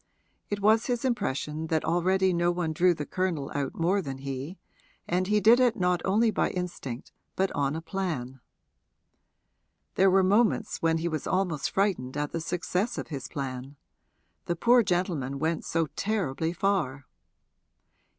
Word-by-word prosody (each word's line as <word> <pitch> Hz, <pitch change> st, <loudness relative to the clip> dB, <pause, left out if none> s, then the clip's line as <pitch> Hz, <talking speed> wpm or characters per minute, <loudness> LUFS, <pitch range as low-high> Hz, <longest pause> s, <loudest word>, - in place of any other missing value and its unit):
It 205 Hz, -1 st, -3 dB
was 220 Hz, +3 st, +4 dB
his 245 Hz, 0 st, -1 dB
impression 155 Hz, -, -2 dB
that 160 Hz, -1 st, 0 dB
already 185 Hz, +2 st, +2 dB
no 175 Hz, 0 st, +2 dB
one 175 Hz, -2 st, -1 dB
drew 175 Hz, +2 st, +3 dB
the 150 Hz, -, -4 dB
Colonel 175 Hz, -6 st, -2 dB
out 140 Hz, -2 st, -2 dB
more 185 Hz, +4 st, +1 dB
than 135 Hz, -5 st, -5 dB
he, 135 Hz, +6 st, -6 dB, 0.5 s
and 180 Hz, +2 st, 0 dB
he 210 Hz, +1 st, +3 dB
did 225 Hz, +4 st, +6 dB
it 245 Hz, -2 st, +3 dB
not 180 Hz, -1 st, +1 dB
only 220 Hz, +4 st, +3 dB
by -, -, +1 dB
instinct 170 Hz, -9 st, -5 dB, 0.2 s
but 190 Hz, 0 st, +1 dB
on 140 Hz, +1 st, 0 dB
a 160 Hz, -, -5 dB
plan. 160 Hz, -9 st, -4 dB, 1.5 s
There 195 Hz, +1 st, +4 dB
were 190 Hz, +1 st, +4 dB
moments 215 Hz, +3 st, +2 dB
when 165 Hz, 0 st, +2 dB
he 165 Hz, +1 st, -2 dB
was 155 Hz, -3 st, -3 dB
almost 180 Hz, -6 st, 0 dB
frightened 175 Hz, -10 st, 0 dB
at 145 Hz, 0 st, -2 dB
the 165 Hz, -, -3 dB
success 180 Hz, +6 st, -2 dB
of -, -, -5 dB
his 140 Hz, -5 st, -5 dB
plan 135 Hz, 0 st, -5 dB, 0.7 s
the 175 Hz, -, -1 dB
poor 240 Hz, +7 st, +5 dB
gentleman 175 Hz, -, -1 dB
went 160 Hz, +3 st, -1 dB
so 165 Hz, -1 st, 0 dB
terribly 170 Hz, -7 st, -1 dB
far. 170 Hz, -8 st, -1 dB
175 Hz, 160 wpm, -28 LUFS, 150-195 Hz, 1.5 s, did